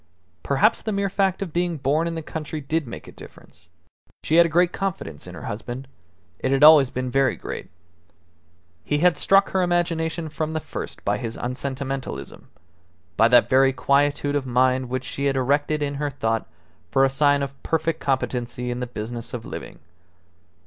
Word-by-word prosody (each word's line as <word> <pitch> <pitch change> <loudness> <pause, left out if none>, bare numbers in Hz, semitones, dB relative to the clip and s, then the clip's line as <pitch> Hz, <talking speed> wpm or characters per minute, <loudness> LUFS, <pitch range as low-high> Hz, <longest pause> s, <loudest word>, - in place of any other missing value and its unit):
Perhaps 195 +11 +2
the 220 - -3
mere 200 -1 -1
fact 195 0 +1
of 170 -5 -8
being 175 -1 0
born 150 +4 +1
in 165 - -3
the 160 - -4
country 155 0 -5
did 155 +1 -2
make 115 - -8
a - - -10
difference. - - -15 0.5
She 160 - +2
had 170 0 +7
a - - -6
great 175 +2 +3
confidence 165 - -4
in - - -9
her - - -9
husband; 120 +5 -6 0.5
it 130 - -1
had 135 +1 +3
always 150 -4 +8
been 130 0 -3
very 135 +1 +2
great. - - -7 1.1
He 145 - 0
had 175 +2 +4
struck 195 +6 +3
her 190 - +1
imagination 170 -2 0
from 155 +1 -3
the 160 - -1
first - - -7
by 100 +1 +1
his 115 -3 -5
unsentimentalism, 130 - -5 0.7
by 115 - +5
that 120 0 +5
very 135 +1 +4
quietude 145 +2 +1
of 135 -2 -1
mind 130 0 +2
which 130 0 -2
she 140 - -3
had 140 -1 +1
erected 145 +3 +1
in 140 0 -2
her 145 - 0
thought 115 -5 -2 0.4
for 135 +6 +4
a - - +4
sign 145 +1 +2
of 140 0 -7
perfect 160 0 -1
competency 125 -2 -2
in 120 - -3
the 125 - -3
business 120 +1 -6
of 115 - -7
living. - - -8
140 Hz, 185 wpm, -23 LUFS, 130-160 Hz, 1.1 s, always